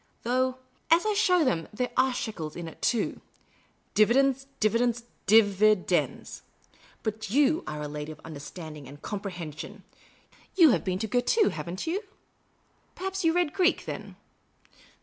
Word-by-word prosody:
Though, 255 +2 +1 0.3
as 335 +4 +5
I 430 - +2
show 360 -4 +4
them, 165 -10 0
there 245 +4 -2
are 260 +1 +3
shekels 185 -11 -4
in 170 -1 -6
it, 160 - -11
too. 230 -4 0 0.7
Dividends, 270 +5 +3
dividends, 230 +2 +1 0.2
di 220 +3 +8
vidends. 205 -2 +1 0.6
Ihxt 215 -1 -3
j'o?t 290 +7 +3
are 150 0 -4
a - - -3
lady 150 +1 -6
of 155 - -11
understanding 155 -1 -8
and 145 +2 -13
comprehension. 180 -7 -6 0.7
You 335 -6 +7
have - - +1
been 185 -3 -1
to 220 +3 -3
Girton, 250 - +2
have - - -6
n't 180 +3 -4
you? 365 +6 -1 0.9
Perhaps 385 0 -3
you 330 - +4
read 345 -3 +1
Greek, 370 -1 +2
then - - -7
220 Hz, 150 wpm, -28 LUFS, 175-275 Hz, 0.9 s, di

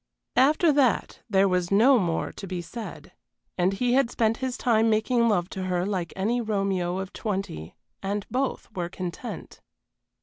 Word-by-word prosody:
After 305 +5 +5
that 275 -5 +1
there 195 -1 +4
was 180 -2 0
no 235 +6 +5
more 170 -4 -1
to 195 - -9
be 185 -1 -4
said, 215 +7 -8 0.4
and 180 +1 +2
he 245 +5 +1
had 265 -2 +3
spent 225 -1 +1
his 260 -2 -3
time 225 -2 +3
making 230 +2 +2
love 180 -5 +1
to 190 -1 -4
her 180 -1 0
like 185 -4 -2
any 225 +6 0
Romeo 195 -5 -1
of 190 0 -5
twenty, 190 - -4 0.3
and 200 +1 -2
both 265 +1 -1
were 175 -2 -2
content. 180 -2 -7
200 Hz, 165 wpm, -26 LUFS, 185-240 Hz, 0.4 s, After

